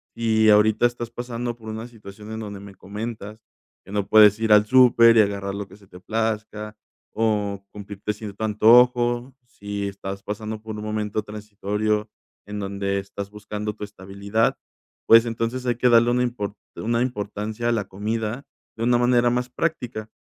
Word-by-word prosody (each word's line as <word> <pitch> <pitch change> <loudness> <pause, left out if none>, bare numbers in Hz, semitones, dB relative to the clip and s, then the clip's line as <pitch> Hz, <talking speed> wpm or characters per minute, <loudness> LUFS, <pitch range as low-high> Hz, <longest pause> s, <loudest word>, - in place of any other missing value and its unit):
y 110 -1 +3
ahorita 105 +2 +4
estás 120 -1 -7
pasando 120 0 -4
por 110 -2 -11
una 110 +2 -6
situación 105 -2 -12
en 110 - -5
donde 105 -2 -7
me 100 -1 -11
comentas 105 +2 -7 0.4
que 95 - -13
no 100 -1 -1
puedes 105 0 +6
ir 110 -1 0
al 105 0 +6
súper 115 -1 +6
y - - +8
agarrar 100 -1 -2
lo 100 -1 -5
que 100 - -15
se 105 - -20
te 90 - -13
plazca, 105 +1 -3 0.4
o 105 -3 -1
cumplirte 105 0 -5
cierto 105 0 -8
antojo. 120 +3 +4
Si 100 -3 -5
estás 100 0 -7
pasando 110 +1 -5
por 110 0 -7
un 105 - -6
momento 105 0 -2
transitorio, 105 0 -3 0.4
en 105 0 -6
donde 100 0 -2
estás 100 0 -7
buscando 105 0 -5
tu 105 - -8
estabilidad, 100 +2 -2 0.5
pues 115 +1 +8
entonces 115 +2 -3
hay 120 -1 +1
que 125 +2 +2
darle 120 0 +5
una 125 +1 +2
impor 120 -5 -3 0.2
una 115 +1 -1
importancia 110 -1 -3
a - - +3
la 105 -4 -2
comida 110 +5 -3 0.3
de 115 - -3
una 120 +1 +3
manera 120 0 +3
más 125 +1 -1
práctica. 125 -7 -3
110 Hz, 170 wpm, -23 LUFS, 105-115 Hz, 0.5 s, y